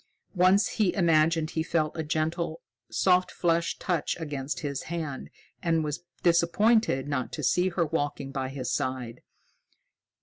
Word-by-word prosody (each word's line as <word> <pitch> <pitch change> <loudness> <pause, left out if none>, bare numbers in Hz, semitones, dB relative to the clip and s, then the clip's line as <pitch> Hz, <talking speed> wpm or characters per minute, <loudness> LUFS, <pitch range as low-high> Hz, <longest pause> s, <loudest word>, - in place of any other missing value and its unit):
Once 185 +2 +4
he 200 -5 0
imagined 165 -3 +3
he 160 - -1
felt 160 -1 0
a 160 - -2
gentle, 160 +2 -2 0.3
soft 185 -1 +3
fleshed 170 -1 0
touch 175 -5 -1
against 140 -4 -4
his 140 -2 -3
hand, 160 -6 -4 0.3
and 165 -2 +1
was 150 0 -3 0.2
disappointed 170 - +3
not 135 -4 -2
to - - -5
see 180 +1 +2
her 175 -1 0
walking 145 -3 -2
by 135 -1 -3
his 130 -2 -4
side. 130 -3 -3
160 Hz, 140 wpm, -27 LUFS, 140-170 Hz, 0.3 s, Once